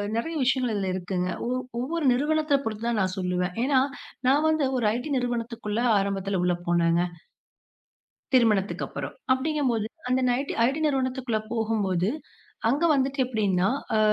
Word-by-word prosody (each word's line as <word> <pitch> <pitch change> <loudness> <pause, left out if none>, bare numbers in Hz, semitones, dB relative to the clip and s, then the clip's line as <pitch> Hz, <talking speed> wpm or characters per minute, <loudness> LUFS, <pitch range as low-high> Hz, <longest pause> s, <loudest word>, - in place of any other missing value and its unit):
நிறைய 280 +9 -2
விஷயங்கள் 250 -2 +1
இதுல 195 -2 -1
இருக்குங்க. 180 0 -2 0.4
ஒவ் 235 - -8
ஒவ்வொரு 335 -3 -1
நிறுவனத்தைப் 295 +1 +1
பொறுத்துதான் 225 +1 -1
நான் 185 -1 -1
சொல்லுவேன். 180 0 -1
ஏன்னா 265 0 +3 0.5
நான் 285 +4 +4
வந்து 310 -2 +2
ஒரு 240 - 0
ஐடி 250 +5 -4
நிறுவனத்துக்குள்ள 235 -3 -2 0.2
ஆரம்பத்துல 195 -1 -1
உள்ள 180 0 +2
போனேங்க. 170 0 +3 1.3
திருமணத்துக்கு 215 -5 +3
அப்பறம். - - -6 0.2
அப்டிங்கும்போது 260 -5 0 0.5
அந்த 270 +3 -1
ஐடி 275 +4 -1
நிறுவனத்துக்குள்ள 260 -5 0
போகும்போது 210 -5 0 0.6
அங்க 280 +8 +1
வந்துட்டு 275 0 0
எப்புடின்னா, 200 -6 +1 0.3
ஆ. - - +3
235 Hz, 125 wpm, -26 LUFS, 195-265 Hz, 1.3 s, நான்